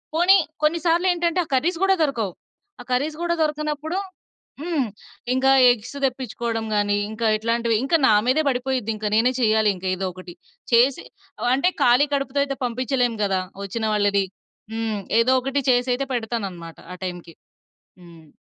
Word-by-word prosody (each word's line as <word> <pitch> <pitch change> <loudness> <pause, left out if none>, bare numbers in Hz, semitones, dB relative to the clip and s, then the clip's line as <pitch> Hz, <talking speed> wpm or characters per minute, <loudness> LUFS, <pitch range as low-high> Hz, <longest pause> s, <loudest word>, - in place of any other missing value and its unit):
పోనీ 365 +4 +6 0.3
కొన్ని 325 +2 +2
సార్లు 345 +2 +2
ఏంటంటే 345 0 0
ఆ - - -23
కర్రీస్ 335 +6 0
గూడా 385 0 +4
దొరకవు. 225 - -1 0.5
ఆ - - -9
కర్రీస్ 300 +5 -1
గూడా 340 0 0
దొరకనప్పుడు 305 +3 -2 0.6
హ్మ్. 310 -7 -1 0.5
ఇంకా 265 +1 +3 0.2
ఎగ్స్ 245 +4 -5
తెప్పించుకోవడం 235 -3 -3
గాని, 205 0 +1
ఇంకా 225 +1 -1
ఇట్లాంటివి 230 +1 0
ఇంకా 330 +5 +3
నా 215 - +5
మీదే 310 +5 +3
పడిపోయిద్ది. 250 -3 -1
ఇంకా 210 0 -2
నేనే 245 +3 +3
చేయాలి 215 -2 +3
ఇంకా 185 +1 -6
ఏదో 190 +1 -3
ఒకటి. 180 -1 -11 0.4
చేసి 250 +3 +3 0.5
అంటే 315 +8 +2
ఖాళీ 250 +5 +5
కడుపుతో 275 0 -1
అయితే 275 -1 -5
పంపించలేము 245 -1 -1
గదా! 190 -2 0 0.2
ఒచ్చిన 220 +3 -3
వాళ్ళని. 200 -1 +2 0.5
హ్మ్. 225 -2 -2 0.2
ఏదో 255 +3 +3
ఒకటి 270 +2 -1
చేసయితే 250 +2 0
పెడతానన్నమాట 200 -8 -4 0.2
ఆ - - -7
టైమ్‌కి. 175 -2 -7 0.7
హ్మ్. 165 -2 -15
245 Hz, 150 wpm, -22 LUFS, 215-285 Hz, 0.7 s, పోనీ